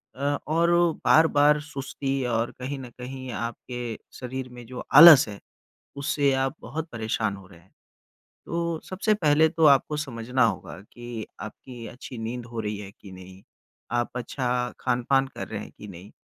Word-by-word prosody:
अ, - - -15 0.3
और 170 +2 +2 0.3
बार-बार 150 -2 +5
सुस्ती 135 -2 -4
और 115 -1 0
कहीं 135 +2 -4
न 125 - -8
कहीं 130 +1 -7
आपके 115 0 -5 0.2
शरीर 130 0 -5
में 120 -1 -11
जो 125 +2 -7
आलस 160 -5 +10
है 100 - -8 0.6
उससे 140 0 +1
आप 135 0 0
बहुत 155 +7 -5
परेशान 110 -3 -2
हो 95 -1 -13
रहे 85 - -16
हैं। 95 - -26 0.8
तो 170 -1 -2
सबसे 205 +3 0
पहले 160 -4 +4
तो 165 0 0
आपको 140 +2 +4
समझना 125 -3 -1
होगा 110 - -2
कि 120 -2 -7
आपकी 115 +2 -9
अच्छी 125 +2 -9
नींद 115 +2 -5
हो 115 -1 -5
रही 105 -1 -3
है 100 -2 -8
कि 100 - -12
नहीं? 95 +1 -12 0.5
आप 120 0 0
अच्छा 125 +1 -4 0.3
खान-पान 130 +2 +1
कर - - -6
रहे 105 -1 -5
हैं - - -11
कि 105 - -10
नहीं? 95 +2 -11
125 Hz, 165 wpm, -26 LUFS, 115-145 Hz, 0.8 s, आलस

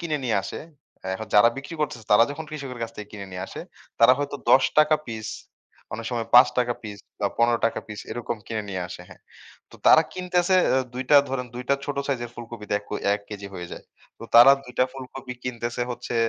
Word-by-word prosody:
কিনে 155 -4 -2
নিয়ে 110 -5 +1
আসে, - - -6 0.5
এ - - -1
হ - - -3
যারা 105 +3 +7
বিক্রি 140 +4 -8
করতেছে, 120 -7 -3
তারা 115 +3 +7
যখন 160 +2 -6
কৃষকের 135 -5 -7
কাছ 115 - -3
থেকে 105 -1 -8
কিনে 100 -2 -7
নিয়ে 90 +1 -4
আসে, - - -8 0.4
তারা 115 +2 +8
হয়তো 145 0 -3
৳১০ 130 - +7
টাকা 155 0 +5
পিস, 110 -2 -5 0.7
অনেক 115 +1 -6
সময় 115 -2 -2
৳৫ 125 - +9
টাকা 120 -1 +1
পিস 105 -2 -8 0.2
বা 100 - +2
৳১৫ 120 0 +3
টাকা - - -2
পিস, 105 0 -7
এরকম 120 -1 -4
কিনে 110 -2 -3
নিয়ে 95 -1 -3
আসে 90 0 -9
হ্যাঁ। 85 - -16 0.5
তো - - -14
তারা 160 - +8
কিনতেছে 180 0 +1 0.2
এ - - +4 0.2
২ 130 - -3
টা 145 - +8
ধরেন, 125 -1 -2
২ 125 +1 -6
টা - - +6
ছোট 145 - -3
সাইজের 120 -4 -2
ফুলকপিতে 115 -3 -8
এক - - -22 0.3
১ 100 - -5
কেজি 100 -1 -7
হয়ে 90 -1 -6
যায়। - - -9 0.4
তো - - -7
তারা 120 +4 +10
২ 125 - -11
টা 130 - +5
ফুলকপি 130 -1 -8
কিনতেছে 120 -1 -3
হচ্ছে 120 - -5
120 Hz, 215 wpm, -24 LUFS, 110-135 Hz, 0.7 s, তারা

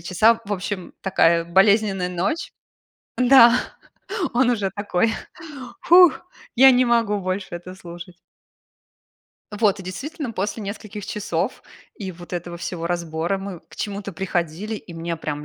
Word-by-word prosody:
часа". 205 +7 +3
В 205 - -4
общем, 185 -1 -4
такая 170 -3 +3
болезненная 195 +1 +3
ночь. 180 - -2 0.6
Да, 250 -1 +7 0.8
он 245 +1 +3
уже 205 -5 0
такой: 205 +1 0 0.7
"Фух, 355 -3 +7 0.4
я 265 +2 +8
не 255 0 +4
могу 230 -4 +2
больше 185 +1 -3
это 180 +2 -9
слушать". 175 -1 -11 1.4
Вот, 205 -3 +2
и - - -8
действительно, 270 - -6
после 210 +1 -3
нескольких 205 0 -7
часов 210 +1 -3 0.3
и 190 -3 -6
вот 175 +1 -13
этого 175 0 -5
всего 170 -1 -5
разбора, 170 +1 -2
мы 195 -2 -7
к - - -15
чему-то 200 -1 -5
приходили, 180 +3 -3
и 175 - -11
мне 165 0 -4
прям 150 -2 -5
195 Hz, 135 wpm, -22 LUFS, 175-220 Hz, 1.4 s, я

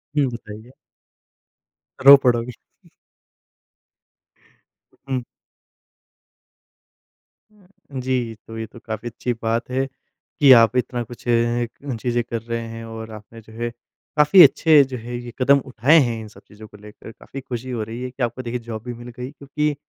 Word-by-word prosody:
हुँ, 145 -2 +3
बताइए। 110 0 -10 1.3
रो 140 +1 +12
पड़ोगे। 120 0 +1 2.6
हुँ। 130 -1 -1 2.3
हाँ 190 -9 -12
जी। 125 -3 -2
तो 115 - -8
ये 110 - -4
तो 120 - -14
काफ़ी 110 +1 -5
अच्छी 125 +1 -3
बात 115 +2 -1
है 130 +1 0 0.5
कि 140 -3 +7
आप 115 0 +5
इतना 125 -1 -1
कुछ 120 +1 -13
अ, 120 - +3 0.7
चीज़ें 120 -1 0
कर 115 -1 -5
रहे 115 0 -4
हैं 115 0 -8
और 110 0 -8
आपने 110 +1 -12
जो 110 0 -17
है 120 +1 -3 0.5
काफ़ी 150 +5 +7
अच्छे 150 +1 +6
जो 130 -1 -6
हैं 120 +2 -8
ये 120 0 -7
कदम 140 +2 +5
उठाए 135 +5 +3
हैं 115 -1 -3
इन 110 - -9
सब 105 - -16
चीज़ों 105 +1 -13
को 105 - -16
लेकर। 105 +2 -13
काफ़ी 135 +4 -10
खुशी 130 0 -6
हो 115 -3 -2
रही 115 +3 -7
है 125 - -4
कि 130 0 -4
आपको 120 +2 -2
देखिए 120 0 -4
जॉब 115 -2 -7
भी 125 0 -6
मिल 120 +1 -10
गई। 125 +1 -5
क्योंकि 145 +1 -2
120 Hz, 160 wpm, -21 LUFS, 115-130 Hz, 2.6 s, रो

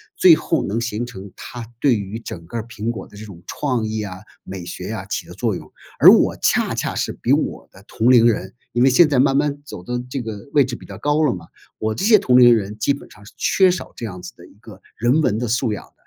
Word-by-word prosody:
最 180 - +7
后 160 +1 0
能 105 +4 -2
形 115 0 -3
成 100 -5 -10
他 120 -2 -8
对 140 -3 +4
于 100 +1 -5
整 85 -7 -8
个 105 - -11
儿 - - -5
苹 115 -1 -5
果 110 -5 -5
的 105 - -16
这 110 - -9
种 90 -5 -13
创 125 -3 -2
意 110 0 -3
啊、 100 -3 -6 0.3
美 95 -2 -7
学 - - -7
啊， - - -5
起 - - -5
的 - - -10
作 - - -1
用。 - - -8 0.3
而 - - +9
我 - - +5
恰 - - +2
恰 - - -3
是 - - -1
比 - - 0
我 - - -1
的 95 - -18
同 115 +3 0
龄 120 -2 +6
人 100 -5 0 0.2
因 120 - 0
为 130 - +6
现 150 +5 +5
在 140 -4 +2
慢 135 +1 +3
慢 145 0 0
走 90 - -9
的 125 +5 -3
这 130 +1 -3
个 110 -2 -7
位 145 -2 +5
置 125 -2 -5
比 - - -14
较 - - -10
高 145 +2 +1
了 140 - +2
嘛， 85 -2 -11 0.3
我 110 0 -1
这 190 - -3
些 220 0 +7
同 125 -11 +4
龄 120 -1 +8
人 105 0 -4
基 140 - +2
本 140 - -11
上 105 - -16
是 - - -15
缺 190 -1 +3
少 180 - -3
这 115 - -7
样 90 -4 -7
子 90 - -9
的 85 - -14
一 - - -20
个 105 -4 -14
人 120 +7 +2
文 120 -9 +1
的 120 0 -3
素 120 0 0
养 105 - -6
的， - - -23
115 Hz, 290 characters per minute, -20 LUFS, 105-135 Hz, 0.3 s, 而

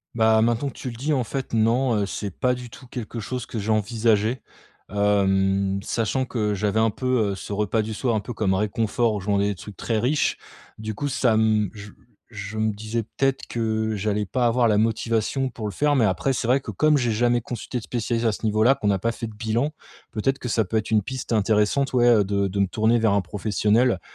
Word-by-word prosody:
Bah, 110 -1 +4
maintenant 120 +4 +1
que - - -12
tu 130 - -5
le 120 - -8
dis, 140 +7 -2
en 130 -4 +1
fait, 135 +3 -4
non, 115 +3 +2
heu, 100 - +1
c'est 100 +1 -4
pas 125 +7 0
du 125 -1 -7
tout 125 +2 -13
quelque 120 -1 -6
chose 125 +3 -4
que 115 - -5
j'ai 105 +2 -1
envisagé, 110 +2 +1 0.5
hem, 100 -1 +1
sachant 115 +5 -1
que 110 -5 -1
j'avais 105 +2 0
un 115 0 +4
peu, 120 -2 0
heu, - - -3
ce 95 - -8
repas 105 +2 0
du 110 +1 -4
soir 120 +1 0
un 110 - 0
peu 105 - -7
comme 105 -3 0
réconfort 110 +3 0
où - - -2
je 100 +2 -6
mangeais 100 0 +2
des 100 - -2
trucs 100 +2 -10
très 115 -2 -1
riches, 140 +6 +1 0.4
du 110 0 -5
coup, 145 +6 -2
ça 125 -2 +2
m 110 -2 +2
je 105 -1 -10 0.4
je 105 +1 -6
me 110 -1 +1
disais 110 +2 -3
peut-être 135 +4 -1
que 110 -1 -1
j'allais 105 +1 -1
pas 120 +5 +1
avoir 120 0 +3
la 105 -2 +3
motivation 115 +4 0
pour 110 -3 -6
le - - -3
faire 145 +8 +1
mais 120 -5 +4
après 95 +8 +1
c'est 120 -2 -2
vrai 130 +3 +4
que - - -7
comme 155 -1 +3
j'ai 120 -4 +1
jamais 120 +2 +2
consulté 120 +2 -5
de 120 - -5
spécialiste 115 0 -2
à 110 - +4
ce 105 - -5
niveau-là, 110 +4 +4
qu'on 130 -7 -1
a 100 - +2
pas 115 +5 -1
fait 115 0 -5
de 110 - -11
bilan, 115 +7 -1 0.4
peut-être 135 +5 -1
que 125 - -5
ça 110 -1 +1
peut 95 - -5
être 110 -1 0
une 110 -2 +3
piste 130 +3 -6
intéressante, 110 +6 +2
ouais, 120 -1 +4
heu, 110 -4 +5
de 100 0 0
de 100 +1 -3
me 100 - +4
tourner 110 +4 +2
vers 110 -3 +2
un 100 - +3
professionnel 105 +3 +1
110 Hz, 240 wpm, -24 LUFS, 105-120 Hz, 0.5 s, heu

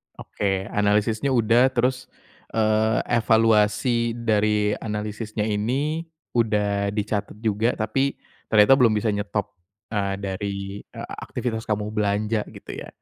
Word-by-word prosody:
Oke, 95 -2 -2
analisisnya 105 +4 +1
udah 120 +1 +4
terus, 125 +1 0 0.5
eee, 110 0 +2 0.2
evaluasi 115 +1 +3
dari 105 -2 +1
analisisnya 105 0 -4
ini 135 +10 -1 0.2
udah 105 -3 +1
dicatat 105 -1 -2
juga. 110 +3 +1
Tapi, 135 +6 0 0.3
ternyata 105 +4 +6
belum 115 -3 +5
bisa 105 0 +1
nyetop, 105 0 -2 0.4
eee, 100 -2 -1
dari, 100 0 -3 0.3
e - - -12 0.2
aktivitas 110 -3 -4
kamu 105 0 -1
belanja, 105 +1 0
gitu - - -10
ya? - - -8
110 Hz, 115 wpm, -24 LUFS, 105-115 Hz, 0.5 s, ternyata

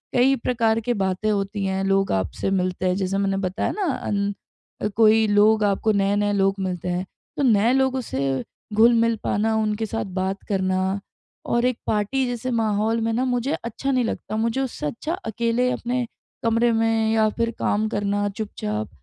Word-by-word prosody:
कई 260 +2 +5
प्रकार 225 -2 +2
की 245 +2 0
बातें 195 +1 -1
होती 200 0 -1
हैं, 190 0 -1
लोग 195 0 +2
आपसे 95 - -1
मिलते 185 -1 0
हैं 180 - +1
जैसे 195 0 -1
मैंने 195 -1 0
बताया 190 +2 -1
न 395 -4 0
अन 205 -2 -4
कोई 220 0 +5
लोग 210 +1 +4
आपको 205 +2 +2
नए-नए 205 0 +1
लोग 195 -1 +2
मिलते 180 -2 -3
हैं 180 +1 -1 0.3
तो 285 - 0
नए 225 -1 +4
लोगों 265 0 +2
से 135 - -2 0.3
घुल-मिल 230 +1 +4
पाना 220 +2 +1
उनके 215 0 0
साथ 225 +1 -3
बात 190 +1 -2
करना 185 -2 +1 0.7
और 235 +1 +1
एक 250 -2 +1
पार्टी 215 +6 +1
जैसे 245 +1 -3
माहौल 220 0 +1
में 225 - 0
न 240 - 0
मुझे 250 +3 0
अच्छा 235 +4 -2
नहीं 255 -2 +2
लगता। 215 - -4
मुझे 230 +4 0
उससे 260 - -4
अच्छा 305 - -4
अकेले 235 +3 0
अपने 245 +1 -1 0.4
कमरे 230 +1 +3
में 225 -1 +2
या 220 -1 +3
फिर 230 0 +1
काम 215 +1 +1
करना 205 -1 0
चुपचाप 110 - -4
215 Hz, 175 wpm, -23 LUFS, 195-230 Hz, 0.7 s, कई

